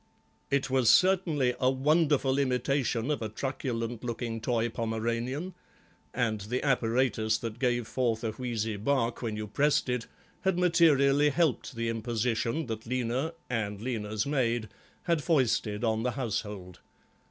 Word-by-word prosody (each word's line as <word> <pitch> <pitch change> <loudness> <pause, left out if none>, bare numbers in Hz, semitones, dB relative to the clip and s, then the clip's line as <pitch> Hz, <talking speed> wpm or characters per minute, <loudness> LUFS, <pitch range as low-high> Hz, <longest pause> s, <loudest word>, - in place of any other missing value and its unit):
It 140 -1 +1
was 130 -4 +3
certainly 170 -9 +4
a 130 - +3
wonderful 140 0 +2
imitation 130 -1 0
of 145 - -1
a 110 - -3
truculent 120 -1 -3
looking 115 -1 -3
toy 115 0 +1
Pomeranian, 115 +8 -2 0.6
and 110 -4 -1
the 120 +8 -3
apparatus 115 -4 +1
that 115 0 -6
gave 120 -3 0
forth 120 -3 -1
a 110 - -1
wheezy 115 -3 -3
bark 115 +2 0
when 115 -3 -2
you 105 - -3
pressed 140 +6 +1
it 125 -2 -2 0.3
had 190 -2 0
materially 150 -5 +4
helped 155 -4 0
the 115 0 -2
imposition 115 +5 -1
that 110 -2 -6
Lena, 130 +6 -1
and 105 -4 -2
Lena's 110 -3 -2
maid, 120 -6 0 0.3
had 170 -4 0
foisted 125 -8 +1
on 110 -1 +1
the 125 +1 -1
household. 105 -7 -4
120 Hz, 140 wpm, -29 LUFS, 115-140 Hz, 0.6 s, certainly